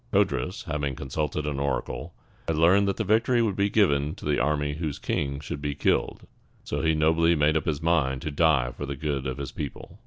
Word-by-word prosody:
Codrus, 90 - 0
having 75 -5 -2
consulted 75 +3 -3
an 70 -2 -2
oracle, 70 -1 -3 0.3
had 80 -2 0
learned 95 +5 +5
that 100 - -1
the 110 - 0
victory 115 +4 +2
would 110 -4 +1
be 100 +1 +1
given 75 -8 +2
to 105 - -11
the 75 0 +1
army 75 -1 0
whose 75 -2 -3
king 70 -1 -2
should 70 0 -6
be 70 -1 -2
killed, 70 - 0 0.4
so 75 - -3
he 80 0 +2
nobly 80 +2 +3
made 75 0 +3
up 80 - 0
his 75 0 -1
mind 70 -6 +1
to 75 - -3
die 70 -5 +2
for 70 +3 -6
the 70 - -3
good 70 -2 -2
of 65 - -3
his 70 -2 -5
people. 70 +2 -7
75 Hz, 215 wpm, -26 LUFS, 70-85 Hz, 0.4 s, learned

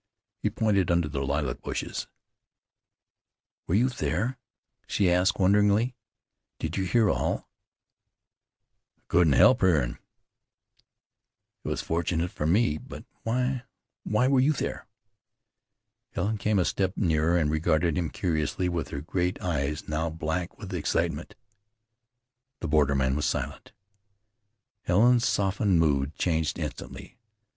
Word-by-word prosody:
He - - 0
pointed 100 -5 +1
under 85 -2 +2
the 70 -2 -3
lilac 70 -2 -2
bushes. - - -4 1.6
"Were 85 - +1
you 120 +5 +4
there?" 125 0 -2 0.5
she 95 -3 +2
asked 90 +2 +2
wonderingly. 105 +5 +3 0.6
"Did 80 +1 -4
you 95 - -1
hear 110 +4 +3
all?" - - -1 1.5
"I - - -40
couldn't 85 -4 +4
help - - +6
hearin'." 75 -10 +2 1.6
"It - - -7
was - - -2
fortunate 85 +1 -1
for 75 - -2
me; 85 -4 +2
but - - -10 0.2
why 125 +2 -1 0.4
why 110 +4 +2
were 135 -1 +4
you 140 +4 +4
there?" 135 - -4 1.3
Helen 105 +4 -1
came 105 +1 +1
a 90 - +3
step 95 0 -1
nearer, 85 -2 +2
and 75 -3 +1
regarded 80 +1 +1
him 85 -1 -1
curiously 85 0 -1
with 85 -3 -2
her 70 - -5
great 90 +3 -1
eyes 75 -3 -2
now 80 +2 -1
black 80 +2 -3
with - - -8
excitement. - - -1 1.2
The 85 - -4
borderman 70 -3 +2
was 75 - -1
silent. - - -4 1.1
Helen's 120 +6 +4
softened 95 -2 +1
mood 70 -2 +1
changed 80 -3 0
instantly. - - -7
85 Hz, 125 wpm, -27 LUFS, 75-100 Hz, 1.6 s, help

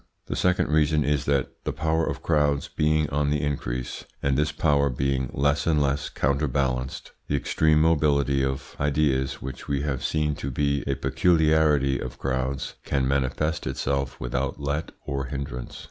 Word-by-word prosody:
The - - -4
second 90 -4 +2
reason 75 0 +3
is 70 -1 0
that 70 -2 +1
the - - -1
power 80 +1 0
of - - -4
crowds 75 -3 +2
being 75 0 +1
on 70 0 +1
the 75 0 0
increase, 65 -4 -3 0.2
and 70 -1 +2
this 75 +2 +1
power 70 -2 +2
being 65 0 -1
less 70 +2 +1
and 80 -2 +3
less 70 0 0
counterbalanced, 65 -2 -1 0.2
the 70 - 0
extreme 75 +2 +2
mobility 70 -4 +3
of 65 0 -3
ideas, 70 -2 +1
which 65 -1 -7
we 70 0 -1
have 70 -4 -2
seen 75 -1 0
to 70 - -4
be 70 +2 0
a 70 - +1
peculiarity 75 0 +3
of 65 - -6
crowds, 65 +2 -2
can 70 -2 0
manifest 70 +4 0
itself 70 -1 -2
without 65 +2 -2
let 75 +3 -2
or 70 -1 -2
hindrance. 65 -2 -5
70 Hz, 160 wpm, -25 LUFS, 65-75 Hz, 0.2 s, reason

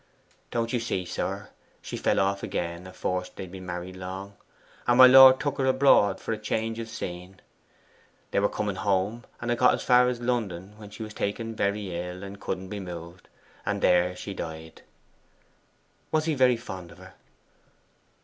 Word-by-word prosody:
'Don't 115 0 -2
you 120 - +2
see, 95 -5 -2
sir, - - -4 0.3
she - - -7
fell - - +1
off 100 0 +1
again 85 +1 -4
afore 90 0 -2
they'd 95 -2 -8
been 95 -1 -9
married 90 +1 -5
long, 95 +2 -7 0.5
and 120 - +4
my 130 - +11
lord 130 0 +9
took 145 -1 -2
her 135 - +2
abroad 130 -7 +4
for 115 - -3
change 110 +1 -2
of 115 -1 -5
scene. 90 -4 -7 0.9
They - - +2
were 100 - +2
coming 100 -3 -3
home, 100 +5 0
and 120 0 -2
had 120 - 0
got 125 - +5
as - - -6
far 125 0 +5
as 125 -1 -1
London, 105 -6 -2
when 105 -1 -11
she 105 +2 -8
was 110 0 -8
taken 115 +3 -3
very 100 -3 -1
ill 90 +2 -5
and 100 0 -9
couldn't 95 0 -4
be 105 0 -5
moved, 85 -1 -9 0.3
and - - -1
there 90 0 +3
she 100 +2 -6
died.' 80 -2 -7 1.3
'Was 155 0 +1
he 160 - +1
very 130 -3 +4
fond 95 -7 -8
of - - -15
her? - - -14
100 Hz, 180 wpm, -27 LUFS, 90-120 Hz, 1.3 s, my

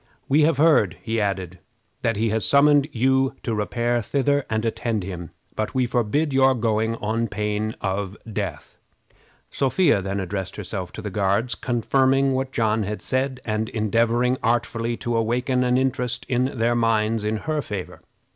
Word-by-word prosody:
"We 145 +3 +4
have 150 -1 +3
heard," 145 - +4
he 115 -1 -1
added, 95 -3 -2 0.4
"that 115 -3 0
he 110 0 +1
has 110 -1 0
summoned 145 0 +4
you 130 +2 +2
to 115 - -2
repair 120 +3 0
thither 140 +4 0
and 110 +1 -1
attend 115 -2 -1
him, 90 -3 -6 0.3
but 110 +3 -3
we 130 -1 +2
forbid 125 +6 0
your 135 0 +4
going 110 -1 0
on 115 +1 -1
pain 105 +2 -2
of 100 +1 -2 0.2
death." 95 -8 -5 0.7
Sophia 135 - +2
then 100 +1 -3
herself 95 0 -4
addressed - - -9
the 105 - -4
Guards, 100 +5 +1
confirming 135 +2 +2
what 130 0 -2
John 110 -2 +1
had 105 +1 -4
said, 130 0 -1
and 110 0 -1
endeavoring 115 +3 +1
artfully 115 0 0
to 120 -2 -2
awaken 125 +3 +1
an 125 0 +2
interest 125 -2 -1
in 130 +2 0
their 115 +1 +2
minds 115 -2 +1
in 110 +1 0
her 155 +5 -2
favor. 100 -8 -6
115 Hz, 160 wpm, -23 LUFS, 105-130 Hz, 0.7 s, We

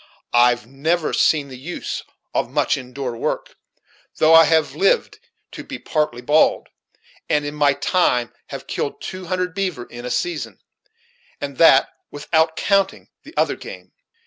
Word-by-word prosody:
I've 120 -1 +4
never 155 +6 -1
seen 145 -3 +2
the 130 -1 -10
use 165 +7 -5 0.3
of - - 0
much 140 0 +1
in 130 -3 -9
door 130 -2 -4
work, - - -3 0.6
though 155 +1 +5
I 165 0 +9
have 160 0 +2
lived 420 +1 +1 0.3
to - - -8
be - - -7
partly 150 -6 -2
bald, 150 +5 +3 0.6
and 150 -1 +1
in 145 - -4
my 145 -2 +3
time 140 -5 +1
have - - -8
killed - - -3
two 185 0 -7
hundred 180 0 -2
beaver 185 -9 -2
in 120 0 -10
a 125 - -4
season, 350 - -3 0.8
and 140 -2 -6
that 140 -5 +6 0.2
without 160 +2 0
counting 195 +1 0
the - - -15
other - - +2
game. - - -11
150 Hz, 155 wpm, -21 LUFS, 130-175 Hz, 0.8 s, I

